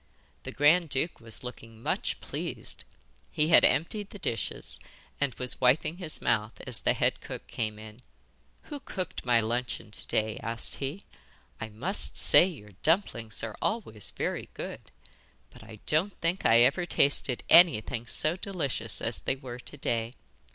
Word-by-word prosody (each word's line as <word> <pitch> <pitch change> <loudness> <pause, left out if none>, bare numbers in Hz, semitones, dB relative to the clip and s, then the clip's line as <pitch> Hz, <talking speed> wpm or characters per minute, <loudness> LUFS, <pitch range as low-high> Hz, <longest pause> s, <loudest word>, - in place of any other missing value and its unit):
The - - -6
grand 155 +4 +3
duke 140 +5 -1
was 115 0 -3
looking 115 -2 -10
much - - -2
pleased. - - -5 0.4
He 150 +1 0
had 165 - +7
emptied 195 +9 +1
the - - -10
dishes, 135 - -3 0.4
and 140 -3 0
was 125 0 -3
wiping 135 +6 +2
his 170 -4 0
mouth 110 -1 0
as - - +2
the - - +1
head - - 0
cook - - -8
came 110 -2 -4
in. 110 +2 -12 0.6
'Who 295 -2 -8
cooked 185 - -6
my 120 -1 +5
luncheon 115 -1 -3
to - - -5
day?' 110 0 -1
asked 115 +1 0
he. 140 +8 -5 0.5
'I 110 - -5
must 145 - 0
say 175 - +8
your 120 - -10
dumplings 120 - 0
are 110 -2 -5
always 115 - -2
very - - -4
good; - - -7 0.6
but 125 - -15
I 110 0 -11
don't 175 +7 0
think 170 +3 0
I 115 +1 +6
ever 145 +8 +3
tasted 140 -5 +1
anything 130 -8 +5
so 155 +8 +3
delicious 145 - -2
as 115 - -1
they 130 - -1
were 125 -2 -9
to 145 - -7
day. 115 -2 -2
130 Hz, 160 wpm, -28 LUFS, 115-165 Hz, 0.6 s, say